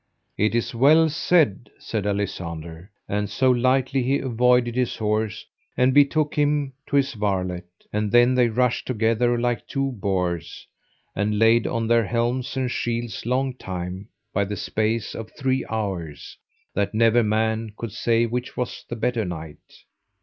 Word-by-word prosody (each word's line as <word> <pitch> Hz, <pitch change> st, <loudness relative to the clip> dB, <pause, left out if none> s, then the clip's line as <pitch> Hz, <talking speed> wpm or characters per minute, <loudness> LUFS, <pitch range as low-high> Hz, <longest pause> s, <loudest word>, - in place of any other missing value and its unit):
It 105 Hz, +2 st, +1 dB
is 120 Hz, -, -1 dB
well 155 Hz, +7 st, +5 dB
said, 155 Hz, -, +2 dB
said 105 Hz, -3 st, -3 dB
Alisander; 85 Hz, -4 st, -4 dB, 0.2 s
and 105 Hz, 0 st, -1 dB
so 130 Hz, -1 st, +2 dB
lightly 130 Hz, +2 st, +2 dB
he 135 Hz, +3 st, +1 dB
avoided 125 Hz, -1 st, +2 dB
his 125 Hz, -1 st, 0 dB
horse 110 Hz, -1 st, -1 dB, 0.3 s
and 130 Hz, +1 st, +3 dB
betook 145 Hz, +2 st, +3 dB
him 145 Hz, -2 st, +1 dB
to -, -, -2 dB
his 140 Hz, -1 st, +2 dB
varlet. 95 Hz, -4 st, -2 dB, 0.3 s
And 105 Hz, -1 st, -1 dB
then 120 Hz, +1 st, +5 dB
they 125 Hz, -1 st, +4 dB
rushed 125 Hz, +1 st, 0 dB
together 120 Hz, 0 st, +1 dB
like 120 Hz, 0 st, -1 dB
two 135 Hz, -1 st, -1 dB
boars, 90 Hz, -, -3 dB, 0.5 s
and 105 Hz, +1 st, 0 dB
laid 115 Hz, +1 st, +4 dB
on 115 Hz, -2 st, -1 dB
their 115 Hz, -1 st, +3 dB
helms 120 Hz, +3 st, -1 dB
and 130 Hz, -2 st, -1 dB
shields 120 Hz, -1 st, -3 dB
long 130 Hz, +1 st, 0 dB
time, 95 Hz, -3 st, -6 dB, 0.3 s
by 100 Hz, +1 st, +1 dB
the 100 Hz, +1 st, -5 dB
space 110 Hz, +2 st, -1 dB
of 115 Hz, -1 st, -7 dB
three 130 Hz, -2 st, 0 dB
hours, 95 Hz, -9 st, -4 dB, 0.4 s
that 100 Hz, +1 st, -1 dB
never 115 Hz, +1 st, +4 dB
man 110 Hz, 0 st, 0 dB
could 115 Hz, -3 st, -5 dB
say 115 Hz, +2 st, +1 dB
which 125 Hz, +2 st, -4 dB
was 125 Hz, 0 st, -4 dB
the 120 Hz, -, -3 dB
better 120 Hz, 0 st, 0 dB
knight. 80 Hz, -4 st, -9 dB
115 Hz, 155 wpm, -23 LUFS, 105-125 Hz, 0.5 s, well